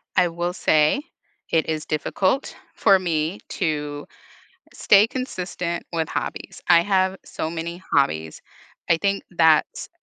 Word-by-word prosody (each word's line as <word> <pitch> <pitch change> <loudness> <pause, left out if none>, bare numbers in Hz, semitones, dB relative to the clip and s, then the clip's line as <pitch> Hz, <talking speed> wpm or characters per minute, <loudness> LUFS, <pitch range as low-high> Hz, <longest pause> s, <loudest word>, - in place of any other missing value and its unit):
I 180 -1 +4
will 175 +1 -3
say 155 - +2 0.5
it 160 -1 +2
is 155 -1 -2
difficult 185 - -1 0.2
for 195 -1 +4
me 165 +1 -1
to 150 -4 -3 0.7
stay 205 +1 +5
consistent 180 -9 -4
with 165 -2 -1
hobbies, - - -5
I 170 -1 +7
have 190 0 +1
so 160 - -4
many 170 +2 -5
hobbies. 80 - 0 0.5
I 170 - +5
think 200 +3 -1
that's 160 -3 +2
170 Hz, 125 wpm, -23 LUFS, 155-185 Hz, 0.7 s, I